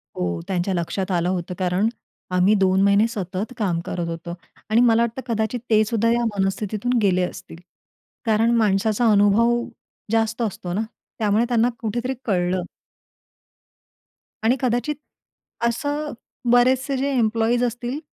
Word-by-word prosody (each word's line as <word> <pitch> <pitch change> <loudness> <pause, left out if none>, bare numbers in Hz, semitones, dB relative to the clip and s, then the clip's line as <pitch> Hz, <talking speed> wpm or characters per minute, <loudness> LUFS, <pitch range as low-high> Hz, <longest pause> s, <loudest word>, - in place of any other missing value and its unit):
हो, 85 -1 -2
त्यांच्या 185 +1 -1
लक्षात 185 +2 -2
आलं 175 -1 +1
होतं. 180 -1 -2
कारण 185 +3 +1 0.4
आम्ही 180 +3 +4
2 190 -1 +3
महिने 200 +2 +4
सतत 200 +2 -4
काम 185 -6 0
करत 175 -1 -3
होतो. 170 +1 -5 0.4
आणि 220 +2 +4
मला 230 -1 +4
वाटतं 235 +2 -1
कदाचित 220 +3 -1
ते 215 -1 +5
सुद्धा 230 +1 +1
या 240 0 +1
मनस्थितीतून 210 +5 -1
गेले 185 -3 +2
असतील. - - -11 0.7
कारण 225 +1 +3
माणसाचा 215 +1 +2
अनुभव 210 +4 +4 0.5
जास्त 225 +1 +1
असतो 185 -5 -3
ना, 205 - 0 0.4
त्यामुळे 215 +1 +2
त्यांना 240 0 +3
कुठेतरी 240 +3 -2
कळलं. 180 -3 0 1.8
आणि 230 +3 +4
कदाचित 250 +4 0 0.7
असं 290 +5 -2 0.4
बरेचसे 260 +3 +3
जे 275 +2 0
एम्प्लॉइज 230 +1 +2
असतील, 245 +3 -2
220 Hz, 130 wpm, -22 LUFS, 190-240 Hz, 1.8 s, ते